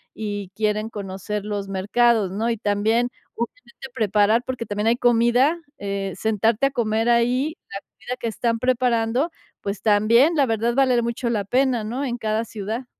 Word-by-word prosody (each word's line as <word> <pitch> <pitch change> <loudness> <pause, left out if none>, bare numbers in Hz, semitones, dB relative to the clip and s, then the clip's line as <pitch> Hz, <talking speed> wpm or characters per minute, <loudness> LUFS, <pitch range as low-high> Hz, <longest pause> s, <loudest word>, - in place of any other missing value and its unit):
y 205 -3 -4
quieren 215 0 -1
conocer 200 0 -5
los 205 -2 -3
mercados, 205 +1 +2
¿no? 220 +4 -1
Y 230 - -1
también, 215 +4 +1 0.3
obviamente 270 - -7
preparar 215 +2 +2
porque 255 -3 -4
también 210 +1 -2
hay 230 - +4
comida, 245 +7 +3 0.2
eh, 195 -1 -3
sentarte 220 +5 +1
a - - -4
comer 225 -3 0
ahí, 250 +6 +2
la 195 - -5
comida 250 +3 -8
que 235 - -3
están 230 +1 -1
preparando, 250 +3 +1 0.3
pues 200 0 -4
también, 230 +9 +4
la 285 - +4
verdad, 230 +1 0
vale 255 -3 +3
mucho 235 +1 -2
la 210 -3 0
pena, 250 +1 +1
¿no?, 240 +6 -3
en 245 -1 -3
cada 220 0 -1
ciudad. 220 +4 -5
225 Hz, 165 wpm, -23 LUFS, 210-245 Hz, 0.3 s, hay